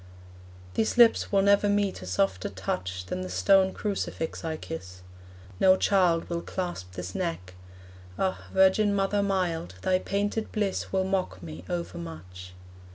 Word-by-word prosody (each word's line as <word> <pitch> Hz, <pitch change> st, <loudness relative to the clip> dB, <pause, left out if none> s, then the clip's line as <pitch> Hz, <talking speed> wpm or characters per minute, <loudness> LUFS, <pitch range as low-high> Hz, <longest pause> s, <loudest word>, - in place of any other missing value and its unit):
These 220 Hz, -, 0 dB
lips 235 Hz, -2 st, +5 dB
will 195 Hz, -1 st, +4 dB
never 200 Hz, +1 st, +4 dB
meet 205 Hz, -, 0 dB
a 90 Hz, -, -8 dB
softer 95 Hz, +1 st, 0 dB
touch 95 Hz, -1 st, -4 dB
Than 90 Hz, 0 st, -4 dB
the 90 Hz, -, -5 dB
stone 190 Hz, -, +4 dB
crucifix 195 Hz, -6 st, -3 dB
I 160 Hz, -1 st, -3 dB
kiss; 90 Hz, -, -8 dB, 0.6 s
no 185 Hz, 0 st, +6 dB
child 180 Hz, -5 st, +2 dB
Will 170 Hz, -1 st, -2 dB
clasp 175 Hz, -, -5 dB
this 90 Hz, 0 st, -6 dB
neck. 165 Hz, -, -3 dB, 0.6 s
Ah, 190 Hz, -1 st, -1 dB
virgin 190 Hz, +2 st, +4 dB
mother 200 Hz, +1 st, +1 dB
mild, 180 Hz, -, -1 dB
Thy 185 Hz, 0 st, +2 dB
painted 205 Hz, +3 st, -2 dB
bliss 205 Hz, -3 st, -2 dB
will 190 Hz, 0 st, +1 dB
mock 185 Hz, -, -2 dB
me 80 Hz, +1 st, -8 dB
overmuch. 85 Hz, +1 st, -6 dB
170 Hz, 145 wpm, -27 LUFS, -, 0.6 s, no